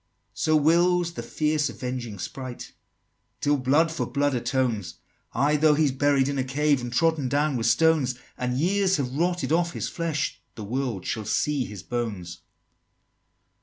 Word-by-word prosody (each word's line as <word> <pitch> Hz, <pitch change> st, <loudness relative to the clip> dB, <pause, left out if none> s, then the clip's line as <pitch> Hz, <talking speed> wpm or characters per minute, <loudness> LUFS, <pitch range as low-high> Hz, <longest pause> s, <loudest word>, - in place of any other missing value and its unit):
XXXIII. -, -, -45 dB
"So 155 Hz, -, +1 dB
wills 170 Hz, +3 st, +3 dB
the -, -, -5 dB
fierce 150 Hz, -1 st, 0 dB
avenging 125 Hz, -4 st, -5 dB
Sprite, 125 Hz, +7 st, -7 dB, 0.7 s
Till 145 Hz, 0 st, +2 dB
blood 145 Hz, +6 st, +2 dB
for 160 Hz, -, -2 dB
blood 145 Hz, 0 st, 0 dB
atones! 120 Hz, -5 st, -1 dB, 0.4 s
Ay, 145 Hz, +5 st, +2 dB
though 150 Hz, 0 st, +4 dB
he's 150 Hz, -2 st, +2 dB
buried 135 Hz, 0 st, +2 dB
in 140 Hz, -1 st, -1 dB
a -, -, +1 dB
cave, 140 Hz, +1 st, +1 dB
And 120 Hz, 0 st, -5 dB
trodden 155 Hz, 0 st, +1 dB
down 145 Hz, +1 st, +1 dB
with 115 Hz, -1 st, 0 dB
stones, 140 Hz, -1 st, +3 dB, 0.2 s
And 125 Hz, 0 st, -2 dB
years 190 Hz, +4 st, +2 dB
have 130 Hz, -3 st, -2 dB
rotted 175 Hz, +3 st, 0 dB
off 170 Hz, +1 st, +2 dB
his -, -, -3 dB
flesh, 160 Hz, -3 st, -2 dB
The 110 Hz, -, -7 dB
world 120 Hz, -3 st, -3 dB
shall 110 Hz, -2 st, -3 dB
see 130 Hz, +5 st, 0 dB
his 105 Hz, -4 st, -9 dB
bones!" 105 Hz, -8 st, -4 dB
140 Hz, 165 wpm, -25 LUFS, 125-155 Hz, 0.7 s, though